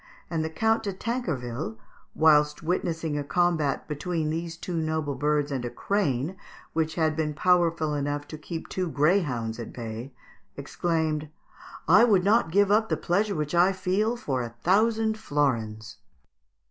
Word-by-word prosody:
and 160 -2 0
the 160 - -2
Count 225 +7 +1
de 205 - -3
Tancarville, 155 - -3 0.4
whilst 150 -1 +4
witnessing 165 -3 -1
a - - -2
combat 160 -3 0
between 155 +1 -2
these 165 +1 -4
noble 160 -4 -1
birds 145 +1 0
and 130 -3 -2
a 120 - -3
crane 160 -3 -1 0.4
which 160 -1 -1
had 160 -2 +1
been 150 -1 -1
powerful 170 -3 +2
enough 145 0 -2
to - - -7
keep 160 +2 -7
two 185 -2 -2
greyhounds 145 - +1
at 115 - -6
bay, 115 +2 -6 0.5
exclaimed, 160 -3 -1 0.6
"I - - +7
would 205 -6 +4
not 210 -1 +3
give 200 +3 +3
up 220 +1 +3
the - - +1
pleasure 200 +3 0
which 150 0 -2
I 175 +3 +4
feel 195 +5 0
for 135 - -2
a 120 - -4
thousand 220 +3 +2
florins!" 115 - -1
160 Hz, 150 wpm, -26 LUFS, 145-185 Hz, 0.6 s, I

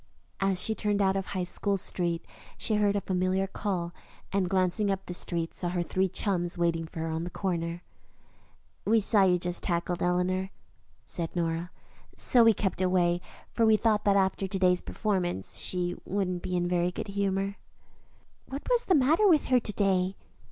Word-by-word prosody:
As 195 -2 +2
she 220 - +2
turned 210 -1 0
out 195 -1 +2
of 195 -1 -2
High 185 -2 -2
School 200 +2 -1
Street 170 -2 -1 0.3
she 220 - 0
heard 205 -1 +2
a 200 - 0
familiar 185 +1 0
call, 185 -3 -3 0.4
and, 190 -2 +1
glancing 190 +2 +1
up 195 0 -2
the 180 - -5
street, 170 -1 0
saw 175 - -3
her 175 0 -1
three 190 +2 0
chums 175 -2 -1
waiting 165 -1 0
for 160 - -7
her 165 - -2
on 160 +1 -2
the 175 - -4
corner. 170 -2 -3 1.0
"We 225 +2 +4
saw 210 0 +3
you 180 -1 +4
just 175 0 -1
as - - -3
you 175 - +2
tackled 170 +1 -3
Eleanor," 180 +2 0 0.6
said 170 0 -4
Nora, 170 0 -1 0.5
"so 245 -2 +4
we 230 - +7
kept 190 -2 -1
away, 175 -1 +2 0.3
for 230 - +1
we 220 -1 +5
thought 215 -2 +1
after 195 -1 +2
to 195 +1 -3
day's 180 -1 +3
performances 180 - -2
she 180 -1 -2
wouldn't 185 -2 -2
be 180 - -3
in 175 - 0
a - - 0
very 175 0 +1
good 190 - -6
humor." 200 0 -1 0.9
"What 275 +2 -6
was 485 -1 +2
the 370 - +4
matter 315 +9 +4
with 320 -6 +4
her 255 -1 +5
to 220 - -5
day?" 190 -2 +1
185 Hz, 190 wpm, -28 LUFS, 175-200 Hz, 1.0 s, we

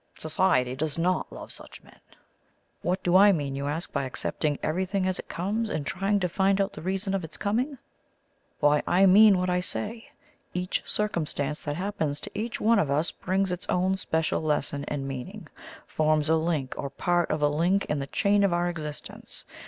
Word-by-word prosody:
Society 155 -6 +1
does 150 +2 -2
not 180 +2 0
love - - -9
such - - -10
men. - - -19 0.8
What 185 +2 -1
do 175 0 +2
I 200 +2 +8
mean, 145 -6 -1
you 140 +1 -3
ask, 160 +4 -3
by 140 - 0
accepting 145 +3 -2
everything 185 +4 0
as 185 -1 0
it - - -9
comes, 210 +6 -2
and 150 -8 -3
trying 195 +5 0
to 180 - +2
find 195 +2 +2
out 195 0 0
the 155 - -8
reason 190 +3 -2
of 195 -2 -1
its 160 - -7
coming? 250 +8 -1 0.8
Why, 145 0 +4
I 185 +3 +5
mean 200 +1 +7
what 180 0 0
I 180 - +2
say. 215 +5 -4 0.5
Each 180 0 -1
circumstance 155 -7 -1
that 145 -1 -2
happens 160 -6 -2
to - - -6
each 220 +3 -3
one 225 0 +4
of 155 - +1
us 150 +4 +1
brings 190 0 -1
its 180 0 -5
own 185 +1 +2
special 160 -4 -1
lesson 145 -2 -1
and 140 -2 -3
meaning 130 -2 -7 0.4
forms 155 0 +1
a 160 - +5
link 160 -5 -1
or 140 - -3
part 175 +5 0
of 155 -1 -1
a - - +6
link 170 +7 +1
in 150 - -1
the 140 - -4
chain 200 +5 +2
of 200 - +3
our 175 0 +1
existence. 150 -3 -7
175 Hz, 195 wpm, -27 LUFS, 150-195 Hz, 0.8 s, I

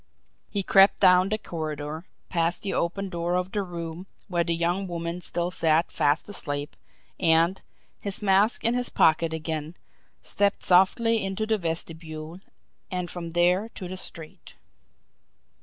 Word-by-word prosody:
He 200 -2 -2
crept 195 +1 +5
down 185 0 +5
the 215 - 0
corridor, 155 -3 -5 0.2
past 170 0 0
the 200 - -2
open 195 +3 -1
door 175 0 -2
of 180 +1 -1
the 205 - -1
room 170 -1 -6 0.2
where 175 -3 +1
the 170 0 -1
young 175 +3 -1
woman 170 0 -4
still 175 0 -1
sat 165 -1 +2
fast 145 +2 +1
asleep, 145 -8 -3 0.4
and, 165 +2 +3 0.4
his 200 -1 -3
mask 205 +2 +3
in 230 - +3
his 245 0 -1
pocket 160 +1 +3
again, 160 0 -4 0.5
stepped 200 0 +1
softly 220 +5 +4
into 195 +3 -2
the 220 -1 0
vestibule, 160 -1 -5 0.5
and 180 -2 -3
from 170 -2 -6
there 180 +5 +2
to 185 - -6
the 185 - -6
street. 165 -4 -5
175 Hz, 145 wpm, -26 LUFS, 165-195 Hz, 0.5 s, crept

